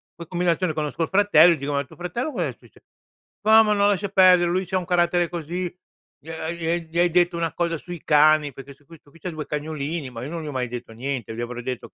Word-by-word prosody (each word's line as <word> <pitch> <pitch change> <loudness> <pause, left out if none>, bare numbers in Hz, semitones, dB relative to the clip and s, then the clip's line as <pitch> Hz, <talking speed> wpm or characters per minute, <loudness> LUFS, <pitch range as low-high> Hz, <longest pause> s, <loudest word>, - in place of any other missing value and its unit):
poi 170 - -9
combinazione 175 -1 0
conosco 150 +1 -2
il - - -3
fratello 190 -4 +6
e - - -4
dico: 140 +1 -4
"Ma 140 0 0
tuo - - -16
fratello, 180 - -3
cos'è - - -2
succe" - - -21 0.6
"No, 220 +1 +7
ma 210 -1 +2
no, 200 -1 +2
lascia 200 0 0
perdere, 185 -2 +5
lui 185 +2 0
c'ha 185 +2 -1
un 180 - -7
carattere 175 -1 +1
così. 175 +1 -4 0.5
Gli 160 - -12
ha 160 0 -4
gli 170 0 -2
gli 170 +2 -2
hai 175 - +4
detto 175 0 +2
una 165 -1 -2
cosa 170 -1 -1
sui 175 0 -9
cani". 150 -1 +4
Perché 135 +2 -11
sto 140 +1 -28
qui 165 +3 -14
sto 145 - -24
qui 165 - -19
c'ha 180 - -5
2 155 -2 -6
cagnolini, 150 0 -4
ma 115 -1 -7
io 135 - -6
non 165 0 -5
gli - - -7
ho - - -4
mai 130 -2 -2
detto 120 -1 -7
niente. 120 -2 -4
Gli 120 - -5
avrò 120 0 -5
detto: 120 -2 -6
165 Hz, 255 wpm, -23 LUFS, 145-175 Hz, 0.6 s, No